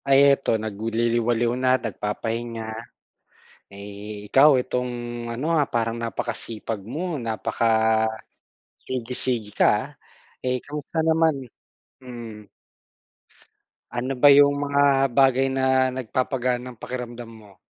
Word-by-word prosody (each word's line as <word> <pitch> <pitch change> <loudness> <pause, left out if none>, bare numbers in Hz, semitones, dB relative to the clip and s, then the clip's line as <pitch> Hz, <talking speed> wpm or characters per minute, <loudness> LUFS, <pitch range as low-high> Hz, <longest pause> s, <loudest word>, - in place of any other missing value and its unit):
Ay 135 0 +6
eto, 135 -4 0
nagliliwaliw 115 +2 0
na, 130 0 +4
nagpapahinga, 115 +1 -4 1.1
eh, 100 +1 -9
ikaw 135 +6 +6
itong 125 0 -2 0.4
ano, 150 +8 -1
ah, 150 -3 +2
parang 115 0 -1
napakasipag 115 -2 -4
mo, 155 - -4
napaka 115 0 -2 1.2
sige 125 -2 -4
sige 115 -5 -2
ka, - - +5
ah. - - -2 0.6
Eh, 125 -1 0
kamusta 150 +2 -4
naman? 160 0 +3 0.7
Hmm. 115 -4 -9 1.4
Ano 125 +3 -3
ba 140 +3 +7
yung 145 0 +6
mga 140 -1 +2
bagay 135 +1 +3
na 130 -1 +2
nagpapagaan 125 0 -1
ng 125 -3 -10
pakiramdam 120 -1 -6
mo? 110 -4 -16
125 Hz, 110 wpm, -24 LUFS, 115-135 Hz, 1.4 s, ba